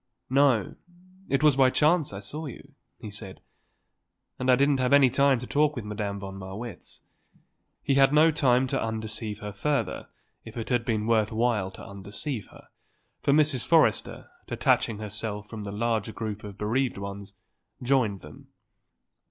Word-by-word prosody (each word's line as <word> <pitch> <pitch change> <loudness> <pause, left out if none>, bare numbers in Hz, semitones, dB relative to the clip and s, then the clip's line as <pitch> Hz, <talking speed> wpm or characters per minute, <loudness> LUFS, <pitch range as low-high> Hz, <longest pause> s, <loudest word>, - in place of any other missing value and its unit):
"No; 130 -7 +3 0.5
it 135 +2 +1
was 150 -3 +5
by 130 -1 +5
chance 155 +3 +2
I 100 0 -7
saw 150 +9 -5
you," 140 +2 -11 0.2
he 105 - -9
said. 95 -2 -6 1.0
"And 130 - -1
I 125 - +7
didn't 140 +1 +2
have 125 +1 +2
any 140 -3 +6
talk 140 +3 +2
with 120 -5 -5
Madame 105 -1 -4
von 95 0 -8
Marwitz." 100 +5 -8 0.8
He 140 - +1
had 135 0 +5
no 155 +2 +5
time 130 -4 +3
to 130 - -1
undeceive 110 -1 -3
her 105 -1 -6
further 140 +3 -2 0.4
if 110 +1 -11
it 115 - -4
had 120 -2 +1
been 110 -4 -1
worth 110 -1 +2
while 110 -4 0
to 95 - -11
undeceive 100 +5 -6
her, - - -17 0.5
for - - +2
Mrs. 145 -3 +3
Forrester, 165 -2 +2 0.2
detaching 110 - +1
herself 105 0 -4
from 105 -2 -7
the 100 - -5
larger 110 0 -1
group 110 -2 -5
of 100 -1 -9
bereaved 120 +5 -1
ones, 100 0 -7 0.5
joined 120 -7 +1
them. 75 0 -13
115 Hz, 160 wpm, -27 LUFS, 105-135 Hz, 1.0 s, I